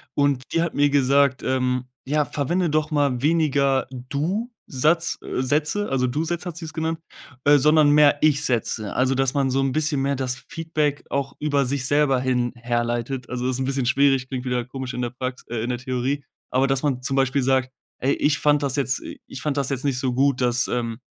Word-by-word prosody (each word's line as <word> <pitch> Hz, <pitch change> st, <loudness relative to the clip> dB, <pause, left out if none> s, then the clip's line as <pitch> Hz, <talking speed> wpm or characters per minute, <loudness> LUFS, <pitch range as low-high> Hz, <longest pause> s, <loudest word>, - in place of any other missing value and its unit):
und 140 Hz, -2 st, +2 dB
die 165 Hz, -, +1 dB
hat 170 Hz, -, -3 dB
mir 145 Hz, 0 st, +3 dB
gesagt, 140 Hz, -1 st, +3 dB
ähm, 125 Hz, -1 st, 0 dB, 0.2 s
ja: 150 Hz, +1 st, +1 dB
„Verwende 170 Hz, +4 st, -1 dB
doch 155 Hz, 0 st, +1 dB
mal 140 Hz, -4 st, +1 dB
weniger 145 Hz, -3 st, +2 dB, 0.2 s
Du-Satz, 165 Hz, -, -1 dB
äh, -, -, -3 dB
Sätze,“ 150 Hz, +10 st, 0 dB
also 125 Hz, -1 st, +1 dB
Du-Sätze 165 Hz, +7 st, -2 dB
hat 170 Hz, -, -9 dB
sie 170 Hz, -, -6 dB
es 160 Hz, -, -8 dB
genannt, 160 Hz, 0 st, -2 dB, 0.4 s
äh, 145 Hz, 0 st, +6 dB
„sondern 150 Hz, +1 st, +5 dB
mehr 145 Hz, -1 st, +5 dB
Ich-Sätze.“ 130 Hz, -8 st, 0 dB
Also, 130 Hz, +1 st, +2 dB
dass 135 Hz, +1 st, +1 dB
man 135 Hz, -2 st, +1 dB
so 135 Hz, -, +1 dB
'n 135 Hz, -1 st, 0 dB
bisschen 150 Hz, -2 st, 0 dB
mehr 140 Hz, +1 st, 0 dB
das 130 Hz, -1 st, -1 dB
Feedback 155 Hz, -3 st, -1 dB
auch 135 Hz, -1 st, -2 dB
über 145 Hz, -2 st, +1 dB
sich 130 Hz, 0 st, -2 dB
selber 145 Hz, -2 st, +3 dB
hin 125 Hz, -2 st, 0 dB
herleitet. 120 Hz, +1 st, -2 dB
Also 125 Hz, 0 st, -2 dB
ist 130 Hz, 0 st, -1 dB
'n 130 Hz, -, -1 dB
bisschen 135 Hz, -1 st, -1 dB
schwierig, 135 Hz, 0 st, +3 dB
klingt 130 Hz, -1 st, -5 dB
wieder 125 Hz, -1 st, -1 dB
komisch 130 Hz, 0 st, -6 dB
in 125 Hz, -, -3 dB
der 120 Hz, -, -2 dB
Prax 130 Hz, 0 st, -5 dB
äh, 120 Hz, -, -3 dB
in 120 Hz, -, -3 dB
der 125 Hz, -, -1 dB
Theorie, 130 Hz, +3 st, -2 dB, 0.3 s
aber 130 Hz, +1 st, +2 dB
dass 135 Hz, -1 st, +1 dB
man 135 Hz, -4 st, -1 dB
zum 135 Hz, 0 st, -1 dB
Beispiel 135 Hz, 0 st, +2 dB
sagt: 130 Hz, 0 st, +1 dB, 0.3 s
„Ey, 135 Hz, +2 st, +1 dB
ich 145 Hz, -1 st, +1 dB
fand 145 Hz, -1 st, +3 dB
das 140 Hz, 0 st, -1 dB
jetzt 135 Hz, -2 st, 0 dB
i -, -, -9 dB
ich 135 Hz, -, -8 dB
fand 150 Hz, -2 st, -1 dB
das 140 Hz, -1 st, 0 dB
jetzt 135 Hz, 0 st, -3 dB
nicht 135 Hz, -3 st, 0 dB
so 130 Hz, -2 st, -1 dB
gut, 135 Hz, 0 st, +2 dB
dass, 125 Hz, 0 st, +2 dB
ähm, 115 Hz, -2 st, -2 dB
135 Hz, 215 wpm, -23 LUFS, 130-145 Hz, 0.4 s, äh